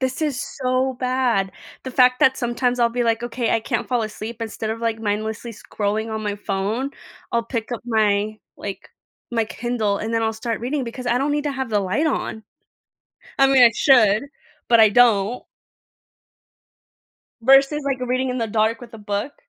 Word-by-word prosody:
this 260 Hz, +3 st, -2 dB
is 285 Hz, -5 st, -1 dB, 0.2 s
so 255 Hz, +1 st, +1 dB
bad. 250 Hz, -7 st, +1 dB, 0.3 s
The 260 Hz, -, -6 dB
fact 250 Hz, 0 st, +4 dB
that 265 Hz, 0 st, +5 dB
sometimes 245 Hz, 0 st, -1 dB
I'll 235 Hz, -1 st, +4 dB
be 240 Hz, +1 st, -1 dB
like, 230 Hz, 0 st, +1 dB
okay, 240 Hz, 0 st, -2 dB
I 225 Hz, -, +1 dB
can't 235 Hz, 0 st, -3 dB
fall 245 Hz, -3 st, +1 dB
asleep 220 Hz, +2 st, -6 dB
instead 220 Hz, 0 st, -4 dB
of, 225 Hz, -, -3 dB
like, 225 Hz, -1 st, -1 dB
mindlessly 220 Hz, +2 st, -3 dB
scrolling 210 Hz, +1 st, -3 dB
on 220 Hz, -, -4 dB
my 205 Hz, -1 st, -2 dB
phone. 205 Hz, +7 st, -2 dB, 0.4 s
I'll 235 Hz, 0 st, +2 dB
pick 230 Hz, 0 st, -4 dB
up 240 Hz, -, -4 dB
my, 215 Hz, -2 st, +1 dB, 0.2 s
like, 200 Hz, -1 st, -7 dB, 0.4 s
my 230 Hz, -1 st, +1 dB
Kindle 225 Hz, -4 st, -1 dB
and 225 Hz, +2 st, -4 dB
then 225 Hz, -, +1 dB
I'll 220 Hz, 0 st, 0 dB
start 225 Hz, 0 st, -3 dB
reading 260 Hz, +2 st, -2 dB
because 250 Hz, +2 st, -7 dB
I 240 Hz, -, +2 dB
don't 285 Hz, +2 st, 0 dB
need 295 Hz, 0 st, -1 dB
to 295 Hz, -, 0 dB
have 265 Hz, -3 st, -4 dB
the 210 Hz, -, +2 dB
light 200 Hz, -, 0 dB
on. 220 Hz, -6 st, -2 dB, 1.0 s
I 270 Hz, -, +6 dB
mean, 270 Hz, -2 st, +5 dB
I 235 Hz, -, +8 dB
should, 230 Hz, -4 st, +4 dB, 0.4 s
but 235 Hz, -1 st, +6 dB
I 220 Hz, -, +8 dB
don't. 225 Hz, 0 st, +3 dB, 2.0 s
Versus, 275 Hz, +4 st, +4 dB
like, 275 Hz, -2 st, -1 dB
reading 255 Hz, +1 st, -1 dB
in 250 Hz, -, -2 dB
the 230 Hz, -, -1 dB
dark 220 Hz, +1 st, +1 dB
with 240 Hz, -1 st, -12 dB
a -, -, -8 dB
book, 205 Hz, +6 st, -3 dB
235 Hz, 190 wpm, -22 LUFS, 220-255 Hz, 2.0 s, I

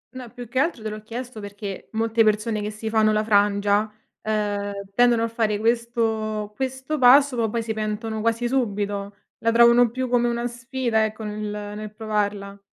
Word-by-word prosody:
No 250 Hz, -2 st, -8 dB
più 245 Hz, 0 st, -9 dB
che 255 Hz, +3 st, -1 dB
altro 280 Hz, -6 st, 0 dB
te 215 Hz, -, -3 dB
l'ho 215 Hz, 0 st, -7 dB
chiesto 235 Hz, +2 st, -7 dB
perché 205 Hz, -1 st, -7 dB
molte 225 Hz, +1 st, +2 dB
persone 215 Hz, 0 st, +1 dB
che 210 Hz, -, -3 dB
si 215 Hz, +1 st, -7 dB
fanno 220 Hz, -1 st, +3 dB
la 215 Hz, 0 st, +1 dB
frangia, 205 Hz, 0 st, +2 dB, 0.3 s
ehm, 205 Hz, -2 st, -1 dB, 0.2 s
tendono 240 Hz, +1 st, +4 dB
a -, -, +1 dB
fare 225 Hz, -2 st, 0 dB
questo 220 Hz, -2 st, -1 dB
questo 265 Hz, +4 st, -3 dB
passo 265 Hz, +2 st, +6 dB
ma 230 Hz, -2 st, 0 dB
poi 230 Hz, +2 st, -2 dB
si 225 Hz, 0 st, -3 dB
pentono 215 Hz, 0 st, -3 dB
quasi 230 Hz, +2 st, 0 dB
subito. 205 Hz, -5 st, -2 dB, 0.2 s
La 230 Hz, -, +1 dB
trovano 235 Hz, +1 st, +6 dB
più 255 Hz, +3 st, -3 dB
come 240 Hz, -1 st, +2 dB
una 235 Hz, 0 st, -1 dB
sfida 240 Hz, -1 st, -1 dB
ecco 220 Hz, 0 st, -3 dB
nel 210 Hz, 0 st, -5 dB
nel 210 Hz, 0 st, -6 dB
provarla. 205 Hz, -2 st, -2 dB
220 Hz, 180 wpm, -23 LUFS, 210-235 Hz, 0.3 s, passo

